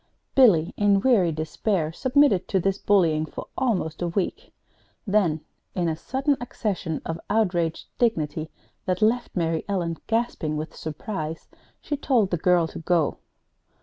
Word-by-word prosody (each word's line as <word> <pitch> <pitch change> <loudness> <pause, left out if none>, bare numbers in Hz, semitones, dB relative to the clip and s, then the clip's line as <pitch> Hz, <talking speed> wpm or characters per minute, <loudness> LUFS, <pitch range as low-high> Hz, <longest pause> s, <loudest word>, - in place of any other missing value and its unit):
Billy, 200 -12 +5
in 205 -1 +4
weary 205 -10 +4
despair, 160 +2 -1
submitted 260 - +3
to 190 - +1
this 195 +2 0
bullying 165 -6 +3
for 155 - -7
almost 185 -12 -1
a 175 - 0
week; 195 - -3 0.5
then, 190 -7 +2 0.3
in 175 -2 0
a 160 - 0
sudden 270 - 0
accession 195 -9 -3
of 165 0 -3
outraged 175 -7 +1
dignity 160 -9 0 0.4
that 185 +2 +1
left 235 +3 +1
Mary 165 -3 0
Ellen 170 -4 -1
gasping 225 -9 -1
with 155 +1 -5
surprise, 160 0 -5 0.3
she 295 - -2
told 240 -9 +2
the 175 - +1
girl 175 0 +3
to - - -8
go. 165 -2 +1
180 Hz, 145 wpm, -25 LUFS, 160-220 Hz, 0.5 s, Billy